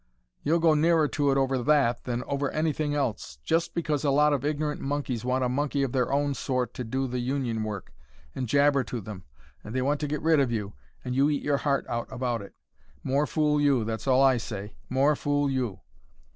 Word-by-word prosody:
"You'll 160 +4 +2
go 165 -1 +4
nearer 160 0 +3
to 145 -2 +1
it 135 - +2
over 135 -1 +1
that, 135 -3 +2
than 120 0 -2
over 140 0 -2
anything 155 -1 -1
else: 135 -7 -2
just 165 +1 0
because 155 -4 -1
a 145 - +2
lot 150 +2 +4
of 140 -2 -1
ignorant 150 0 -1
monkeys 135 -5 -2
want 130 +1 0
a - - +2
monkey 140 +2 0
of 135 - -1
their 125 -1 0
own 140 0 +1
sort 130 -2 -2
to 125 - -5
do 130 +4 -2
the 125 -1 -3
Union 120 -3 -1
work, 105 -3 -6 0.4
and 130 - -3
jabber 140 0 +4
to 120 +1 -4
them, 95 -4 -9 0.4
they 115 +5 -3
want 145 +2 +1
to 150 - -2
get 150 0 -3
rid 160 -1 +4
of 135 -4 +2
you, 105 -3 -3 0.3
and 125 - -2
you 140 +2 +4
eat 145 -2 -1
your 145 -1 +1
heart 140 -1 0
out 120 0 -3
about 120 -3 -2
it. 100 - -12 0.5
More 140 +3 +1
fool 150 -1 +1
you, 140 -5 +3
that's 110 +2 -4
all 130 0 +5
I 135 -2 +5
say 105 -2 -6
more 135 +4 +3
fool 145 -1 0
you. 120 -9 -2
135 Hz, 215 wpm, -27 LUFS, 125-145 Hz, 0.5 s, all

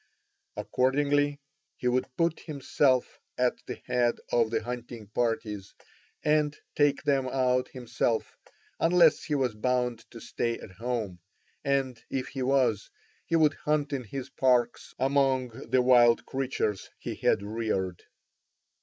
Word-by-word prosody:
Accordingly 145 +2 +1 0.4
he 125 - -2
would 125 +1 +1
put 165 -1 +1
himself 140 -3 0 0.2
at 125 0 +1
the - - -4
head 120 -1 +2 0.2
of 115 -2 +3
the 115 - -1
hunting 120 -1 -6
parties 110 -3 -2 0.5
and 150 -1 +2 0.2
take 145 -1 +2
them 135 -2 +1
out 125 -1 +1
himself 120 -2 -2 0.4
unless 170 -1 +5
he 150 - -1
was 130 -5 +1
bound 125 +1 0
to 115 - -11
stay 115 +1 -2
at - - -11
home, 110 -3 -4 0.4
and, 135 -4 0
if 130 -1 -3
he 135 - -5
was, 125 -5 +1 0.4
he 165 - +1
would 155 -3 +4
hunt 150 0 -1
in 135 -2 -2
his 130 +5 -6
parks 125 -2 +1
among 135 -1 +2 0.2
the 130 +1 +3
wild 120 -2 +5
creatures 130 -7 -2
he - - -5
had 100 - +1
reared. 100 -4 -2
125 Hz, 135 wpm, -28 LUFS, 115-140 Hz, 0.5 s, unless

